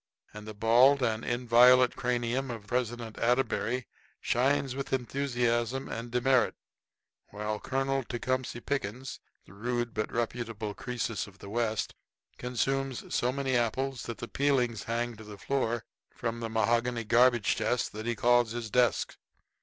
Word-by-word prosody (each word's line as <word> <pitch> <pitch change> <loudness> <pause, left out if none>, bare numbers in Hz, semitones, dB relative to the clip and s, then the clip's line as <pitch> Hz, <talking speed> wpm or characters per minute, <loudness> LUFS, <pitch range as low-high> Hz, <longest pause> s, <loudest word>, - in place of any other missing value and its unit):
And 105 0 -9
the 110 - -7
bald 125 +6 +5
and 110 -2 0
inviolate 125 +1 +5
cranium 125 +2 -1
of 115 -4 -6
President 120 -1 -3
Atterbury 125 0 +1 0.3
shines 135 +1 +1
with 135 0 -5
enthusiasm 125 -1 0
and 115 +1 -5
demerit, 125 0 +2 0.7
while 105 +1 -4
Colonel 135 0 -1
Tecumseh 125 0 -2
Pickens, 130 -1 -3 0.3
the - - -16
rude 120 +3 -2
but 110 0 -2
reputable 115 -2 -3
Croesus 125 -3 -3
of 100 -1 -15
the 100 0 -10
West, 110 -2 -1 0.5
consumes 135 +1 -2
so 125 - +2
many 135 -1 -1
apples 125 +2 0
that 115 - -5
the 115 - -6
peelings 125 -6 +1
hang 120 +1 -2
to 110 - -10
the 105 -1 -10
floor 120 -1 -1 0.3
from 115 -1 -3
the 115 -1 -3
mahogany 115 +1 +1
garbage 120 0 +4
chest 110 +2 0
that 110 +2 -6
he 120 - 0
calls 120 0 +3
his 115 -3 -5
desk. 125 -3 +2
120 Hz, 145 wpm, -30 LUFS, 115-125 Hz, 0.7 s, bald